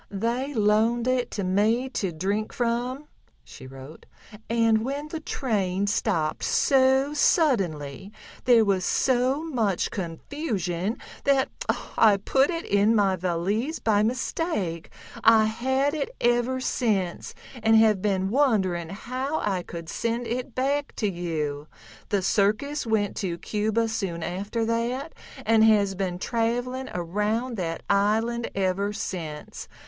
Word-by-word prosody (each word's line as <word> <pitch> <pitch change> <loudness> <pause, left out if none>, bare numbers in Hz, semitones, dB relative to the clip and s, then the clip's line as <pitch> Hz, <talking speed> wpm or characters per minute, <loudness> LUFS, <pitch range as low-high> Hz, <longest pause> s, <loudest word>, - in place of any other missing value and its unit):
"They 235 +7 -2
loaned 220 +3 +2
it 255 -1 +1
to 200 - -4
me 215 +7 +2
to 195 -8 -2
drink 200 +6 -2
from," 245 +4 -2 0.4
she 130 - -12
wrote, 135 +4 -12 0.4
"and 225 -1 +3
when 285 +4 -4
the 320 - -4
train 200 -10 -1
stopped 200 -7 0
so 265 +1 +3
suddenly, 195 - +1 0.3
there 235 -3 +6
was 195 -2 +1
so 260 - +1
much 230 - -1
confusion 190 - -3 0.3
that 275 -1 +3 0.5
I 215 -3 +6
put 265 +7 +2
it 335 -1 -3
in 205 +3 +3
my 195 -3 +3
valise 185 - -1
by 210 -2 +2
mistake. 220 - -2 0.3
I 225 -1 +6
have 220 +1 -3
had 265 +3 +1
it 300 -3 -2
ever 240 +2 +1
since 205 -9 -1 0.3
and 225 0 +4
have 220 -3 +5
been 190 -1 0
wondering 195 - +1
how 255 - -3
I 195 -3 -1
could 170 -1 -8
send 235 +6 -2
it 245 +1 -4
back 280 +2 -1
to 215 - 0
you. 155 -5 -3 0.4
The 200 -2 0
circus 225 +9 +1
went 210 -3 0
to 175 -4 -2
Cuba 215 +5 0
soon 195 -7 -3
after 200 +6 -2
that, 240 +6 -2 0.3
and 225 0 +4
has 205 -3 +4
been 185 -2 -3
traveling 245 +5 -2
around 210 +8 -1
that 165 -3 -3
island 220 +4 +1
ever 195 +1 0
since. 170 -8 -6
220 Hz, 135 wpm, -25 LUFS, 190-250 Hz, 0.5 s, there